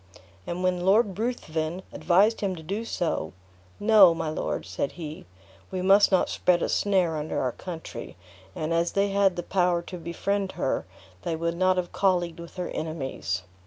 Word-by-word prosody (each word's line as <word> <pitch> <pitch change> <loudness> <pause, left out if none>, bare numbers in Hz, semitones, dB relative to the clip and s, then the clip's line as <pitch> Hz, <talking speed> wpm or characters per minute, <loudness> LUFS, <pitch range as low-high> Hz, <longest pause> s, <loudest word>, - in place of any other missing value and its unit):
And 175 +1 -3
when 180 -1 +1
Lord 200 0 +3
Ruthven 175 -7 -2
advised 205 +6 +3
him 195 -2 -1
to 160 - -10
do 200 +8 -3
so, 160 - -2 0.5
"No, 205 -5 +7
my 160 - -2
lord," 155 - -3
said 140 - -3
he, 155 - -8 0.4
"we 185 -1 -3
must 200 +2 +6
not 190 - +3
spread 175 -1 +2
a - - 0
snare 185 -5 +2
under 150 +1 -2
our 130 - 0
country, 160 - -8 0.4
and 155 +1 -2
as 170 +1 +1
they 200 0 +2
had 195 -2 +3
the 175 - -3
power 175 -2 +1
to 180 +1 -8
befriend 190 +4 -2
her, - - -1 0.3
they 165 - -2
would 170 +1 -2
not 185 +1 +2
have 180 -1 -2
colleagued 175 -4 +1
with 170 0 -10
her 180 -1 -3
enemies. 135 - -3
175 Hz, 175 wpm, -26 LUFS, 165-195 Hz, 0.5 s, No